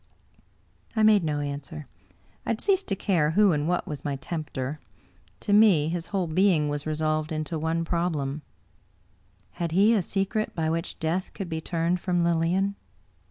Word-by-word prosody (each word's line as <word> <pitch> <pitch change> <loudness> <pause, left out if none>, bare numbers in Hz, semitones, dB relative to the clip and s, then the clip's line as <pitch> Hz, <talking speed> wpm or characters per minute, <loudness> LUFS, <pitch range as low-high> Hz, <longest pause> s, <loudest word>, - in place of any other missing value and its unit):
I 220 - +2
made 215 -3 +5
no 150 -2 -1
answer. 145 +1 -6 0.6
I - - -6
had 230 - 0
ceased 390 -1 +1
to 195 - 0
care 175 -6 +1
who 210 -2 +6
and 150 -1 0
what 180 0 0
was 150 -2 -6
my 145 -1 -2
tempter. 145 -1 -4 0.6
To 205 - 0
me 200 -8 +5
his 170 0 -3
whole 195 -3 -1
being 165 -2 +2
was 145 +1 -4
resolved 155 0 -1
into 155 +1 -3
one 165 +1 -1
problem: 155 -5 -1 1.2
had 170 -2 -1
he 205 +5 +5
a 215 - +3
secret 195 +4 -2
by 160 -1 0
which 165 0 -3
death 170 +4 -2
could 190 -3 -5
be 160 -1 -3
turned 170 +2 0
from 175 -1 0
Lilian? 170 +4 +1
165 Hz, 165 wpm, -26 LUFS, 155-190 Hz, 1.2 s, who